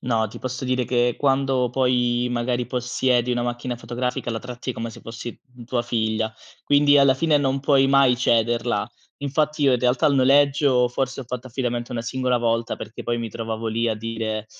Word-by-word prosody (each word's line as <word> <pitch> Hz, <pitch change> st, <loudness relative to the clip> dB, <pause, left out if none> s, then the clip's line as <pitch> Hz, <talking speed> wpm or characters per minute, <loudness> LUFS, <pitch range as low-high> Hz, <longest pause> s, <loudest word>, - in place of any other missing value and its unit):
No, 115 Hz, -3 st, 0 dB
ti -, -, -10 dB
posso 130 Hz, +1 st, -5 dB
dire 130 Hz, 0 st, 0 dB
che 120 Hz, -1 st, +1 dB
quando 135 Hz, -3 st, +1 dB
poi 125 Hz, -1 st, +1 dB
magari 120 Hz, 0 st, -1 dB
possiedi 125 Hz, 0 st, 0 dB
una 120 Hz, 0 st, -1 dB
macchina 120 Hz, +1 st, -3 dB
fotografica 120 Hz, +1 st, -3 dB
la 115 Hz, -, -2 dB
tratti 125 Hz, +1 st, -6 dB
come 115 Hz, 0 st, -5 dB
se -, -, -12 dB
fossi 115 Hz, +1 st, -8 dB, 0.2 s
m 120 Hz, -, -10 dB
tua 120 Hz, 0 st, -1 dB
figlia, 110 Hz, -1 st, -1 dB, 0.3 s
quindi 145 Hz, 0 st, +4 dB
alla 140 Hz, -1 st, +5 dB
fine 155 Hz, +2 st, +2 dB
non 135 Hz, -1 st, +1 dB
puoi 135 Hz, -1 st, +3 dB
mai 135 Hz, -2 st, +4 dB
cederla. 115 Hz, -2 st, +1 dB, 0.3 s
Infatti 150 Hz, +1 st, -1 dB
io 135 Hz, -2 st, +5 dB
in 125 Hz, -, +2 dB
realtà 125 Hz, +2 st, +2 dB
il 140 Hz, -, +3 dB
noleggio 135 Hz, -1 st, +4 dB
forse 130 Hz, +2 st, -3 dB
ho -, -, -7 dB
fatto 125 Hz, +1 st, -6 dB
affidamento 120 Hz, -1 st, -3 dB
una 115 Hz, -2 st, -3 dB
singola 125 Hz, +1 st, 0 dB
volta 115 Hz, 0 st, -1 dB
perché 115 Hz, -, -8 dB
poi 120 Hz, 0 st, -2 dB
mi 115 Hz, -1 st, -3 dB
trovavo 115 Hz, +1 st, -5 dB
lì 115 Hz, +1 st, 0 dB
a 110 Hz, -, 0 dB
dire, 110 Hz, -1 st, -4 dB
125 Hz, 195 wpm, -23 LUFS, 115-130 Hz, 0.3 s, alla